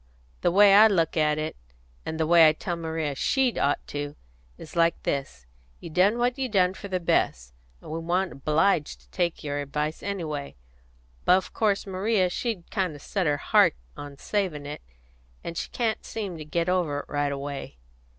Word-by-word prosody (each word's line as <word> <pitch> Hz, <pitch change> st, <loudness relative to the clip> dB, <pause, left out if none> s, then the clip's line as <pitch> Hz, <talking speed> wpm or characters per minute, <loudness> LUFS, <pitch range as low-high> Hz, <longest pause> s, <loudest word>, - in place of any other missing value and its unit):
The -, -, +3 dB
way 200 Hz, +2 st, +6 dB
I 215 Hz, +2 st, +9 dB
look 170 Hz, -6 st, +1 dB
at 150 Hz, -2 st, +2 dB
it, 155 Hz, 0 st, -3 dB, 0.5 s
and 160 Hz, -, -4 dB
the 160 Hz, -, +2 dB
way 165 Hz, -1 st, +7 dB
I -, -, +1 dB
tell 175 Hz, +2 st, -4 dB
Maria 160 Hz, -3 st, -3 dB
she'd 260 Hz, -, +1 dB
ought 145 Hz, -, +1 dB
to, 145 Hz, 0 st, -4 dB, 0.4 s
is 160 Hz, -, -11 dB
like 170 Hz, 0 st, +3 dB
this: 135 Hz, -, -3 dB, 0.3 s
You 170 Hz, -, -9 dB
done 190 Hz, +7 st, +3 dB
what 245 Hz, +2 st, 0 dB
you 260 Hz, -1 st, -1 dB
done 185 Hz, -4 st, +3 dB
for 200 Hz, -, -8 dB
the 185 Hz, -2 st, -1 dB
best, 65 Hz, -, 0 dB, 0.3 s
and -, -, -10 dB
we 160 Hz, -, -3 dB
wa'n't 175 Hz, +2 st, 0 dB
obliged 155 Hz, +3 st, +1 dB
to -, -, -26 dB
take 175 Hz, -3 st, -1 dB
your 145 Hz, -1 st, -2 dB
advice 150 Hz, +2 st, -3 dB
anyway. 160 Hz, -8 st, -4 dB, 0.7 s
But 180 Hz, -, +5 dB
of 190 Hz, -, -5 dB
course 210 Hz, -2 st, +1 dB
Maria 190 Hz, -1 st, +1 dB
she'd 215 Hz, -4 st, -4 dB
kind 185 Hz, -6 st, -1 dB
of 145 Hz, -, -12 dB
set 195 Hz, -5 st, -1 dB
her 145 Hz, -1 st, +2 dB
heart 140 Hz, -, +4 dB, 0.2 s
on 145 Hz, -1 st, -9 dB
savin' 180 Hz, -6 st, -2 dB
it, 145 Hz, +1 st, -7 dB, 0.6 s
and 170 Hz, -, -6 dB
she -, -, -4 dB
can't 230 Hz, -3 st, -1 dB
seem 205 Hz, -5 st, -5 dB
to 155 Hz, -, -7 dB
get 165 Hz, +3 st, -1 dB
over 170 Hz, -6 st, 0 dB
it -, -, -17 dB
right 145 Hz, -1 st, -1 dB
away." 140 Hz, -, -6 dB
170 Hz, 190 wpm, -26 LUFS, 150-195 Hz, 0.7 s, I